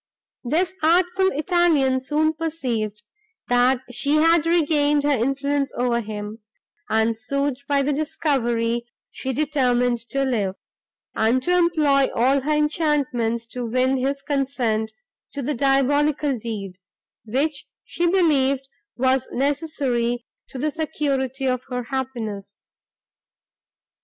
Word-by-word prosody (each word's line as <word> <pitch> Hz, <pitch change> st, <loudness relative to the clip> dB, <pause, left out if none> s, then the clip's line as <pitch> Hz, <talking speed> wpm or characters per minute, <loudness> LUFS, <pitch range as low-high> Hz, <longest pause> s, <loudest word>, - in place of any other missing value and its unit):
This 330 Hz, +9 st, 0 dB
artful 355 Hz, +4 st, +3 dB
Italian 300 Hz, -5 st, +2 dB
soon 305 Hz, +4 st, +1 dB
perceived, 245 Hz, -10 st, -3 dB, 0.5 s
that 245 Hz, +1 st, +3 dB
she 280 Hz, +4 st, 0 dB
had 330 Hz, +1 st, +4 dB
regained 295 Hz, -3 st, +2 dB
her 290 Hz, -, +2 dB
influence 275 Hz, +2 st, 0 dB
over 240 Hz, -1 st, +1 dB
him, 210 Hz, 0 st, -6 dB, 0.5 s
and, 220 Hz, +1 st, +2 dB
soothed 275 Hz, +4 st, -2 dB
by 280 Hz, -1 st, +2 dB
the 290 Hz, +2 st, 0 dB
discovery, 240 Hz, -6 st, -1 dB, 0.2 s
she 265 Hz, -, -4 dB
determined 250 Hz, -4 st, +1 dB
to 275 Hz, 0 st, 0 dB
live, 205 Hz, -7 st, -1 dB, 0.6 s
and 225 Hz, +4 st, +2 dB
to 360 Hz, +4 st, +2 dB
employ 305 Hz, -6 st, +3 dB
all 265 Hz, +4 st, +3 dB
her 295 Hz, +4 st, -2 dB
enchantments 295 Hz, -7 st, 0 dB
to 245 Hz, +2 st, -6 dB
win 255 Hz, +3 st, +1 dB
his 275 Hz, +2 st, -1 dB
consent 250 Hz, -6 st, -1 dB, 0.4 s
to 280 Hz, -, -4 dB
the 295 Hz, +4 st, -1 dB
diabolical 280 Hz, +2 st, +2 dB
deed, 205 Hz, -5 st, -6 dB, 0.5 s
which 275 Hz, +7 st, -1 dB, 0.2 s
she 345 Hz, -, -1 dB
believed 275 Hz, -7 st, +2 dB, 0.3 s
was 260 Hz, +1 st, +1 dB
necessary 260 Hz, -4 st, -1 dB, 0.2 s
to -, -, -9 dB
the 300 Hz, +4 st, -1 dB
security 275 Hz, -4 st, -2 dB
of 255 Hz, -1 st, -1 dB
her 250 Hz, -2 st, -4 dB
happiness. 235 Hz, -6 st, -5 dB
270 Hz, 115 wpm, -23 LUFS, 240-300 Hz, 0.6 s, had